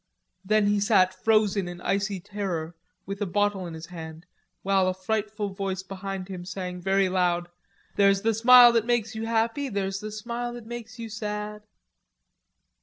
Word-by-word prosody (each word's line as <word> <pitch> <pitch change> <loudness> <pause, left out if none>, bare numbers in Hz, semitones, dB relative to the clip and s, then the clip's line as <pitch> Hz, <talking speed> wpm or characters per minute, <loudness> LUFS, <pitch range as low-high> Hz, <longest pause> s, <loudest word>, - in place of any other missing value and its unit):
Then 215 +2 +3
he 205 0 +2
sat 200 -3 +4
frozen 210 -4 +2
in 175 0 -7
icy 200 +1 -1
terror 175 -4 -4 0.3
with 195 +1 -6
a 205 - 0
bottle 205 -1 0
in 165 - -7
his 160 +1 -8
hand, 160 -1 -9 0.4
while 195 -1 +2
a 185 - 0
frightful 210 +2 -2
voice 190 -1 -4
behind 195 -1 -6
him 185 -2 -7
sang 180 0 -5
very 195 +1 +2
loud: 175 -2 0 0.5
"There's 200 0 +4
the 225 0 +2
smile 240 +2 +8
that 230 -1 +1
makes 240 -2 +1
you 220 0 -4
happy, 230 +5 0
There's 195 -2 -2
the 215 +1 -6
smile 235 +3 -4
that 240 -2 -9
makes 230 -1 -8
you 230 -1 -6
sad." 210 -1 -5
200 Hz, 170 wpm, -26 LUFS, 185-220 Hz, 0.5 s, smile